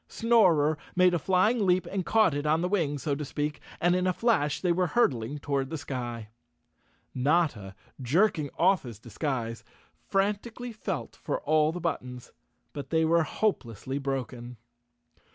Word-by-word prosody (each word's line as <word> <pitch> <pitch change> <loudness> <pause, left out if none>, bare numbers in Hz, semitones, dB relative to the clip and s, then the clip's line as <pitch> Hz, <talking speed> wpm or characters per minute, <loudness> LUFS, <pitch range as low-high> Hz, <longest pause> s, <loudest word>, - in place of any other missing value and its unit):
Snorer 175 -11 +3 0.2
made 180 0 +5
a 175 - +1
flying 195 +7 +2
leap 185 -1 +2
and 190 -1 -3
caught 215 -3 +3
it 145 +1 -2
on 155 +2 +2
the 180 - 0
wing, 165 -7 0
so 145 +1 -2
to 145 +2 -3
speak, 145 +1 -3 0.2
and 175 +1 +3
in 185 0 +1
a 185 - +2
flash 175 - +1
they 180 - +1
were 180 +1 +1
hurtling 140 - +1
toward 140 -2 -2
the 160 - -4
sky. 120 -6 -5 0.8
Notta, 130 - 0 0.3
jerking 155 - +2
oft 185 0 +4
his 120 -5 -9
disguise, 115 -2 -4 0.5
frantically 210 +5 -1
felt 220 - -5
for - - -3
all 155 0 +2
the 180 - -5
buttons, 125 -7 -4 0.4
but 145 - -7
they 160 0 +2
were 165 +1 +3
hopelessly 140 - -2
broken. 125 -3 -4
155 Hz, 155 wpm, -28 LUFS, 135-185 Hz, 0.8 s, made